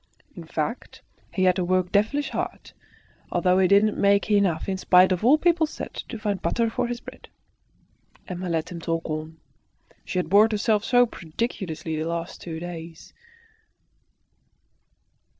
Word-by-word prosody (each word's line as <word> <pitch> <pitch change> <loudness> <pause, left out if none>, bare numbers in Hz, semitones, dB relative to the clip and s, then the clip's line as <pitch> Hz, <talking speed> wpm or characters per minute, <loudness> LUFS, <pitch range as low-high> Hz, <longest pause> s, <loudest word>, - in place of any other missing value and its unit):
In - - -9
fact, - - -4 0.3
he 185 - -1
had 185 0 +4
to 185 - 0
work 185 0 0
devilish 250 +9 +1
hard, - - -5 0.6
although 180 0 +2
he 190 - +4
didn't 200 +2 +3
make 200 +1 +3
enough, 195 -6 +2
in 190 -1 -2
spite 185 0 +5
of 185 +2 -1
all 265 +6 +6
people 335 -1 +2
said, - - -7
to - - -7
find 205 -3 -2
butter 230 -1 0
for 240 - -1
his 240 0 -4
bread. - - -12 1.0
Emma 180 0 -5
let 165 0 -2
him 170 -1 -7
talk 165 0 -2
on. 155 0 -5 0.7
She - - -5
had 180 - 0
bored 210 +5 +5
herself 215 0 +1
so 245 0 +4
prodigiously 165 -5 -4
the 160 - -2
last 170 +1 -4
two 160 -2 -6
days. 165 -1 -9
185 Hz, 155 wpm, -25 LUFS, 170-215 Hz, 1.0 s, all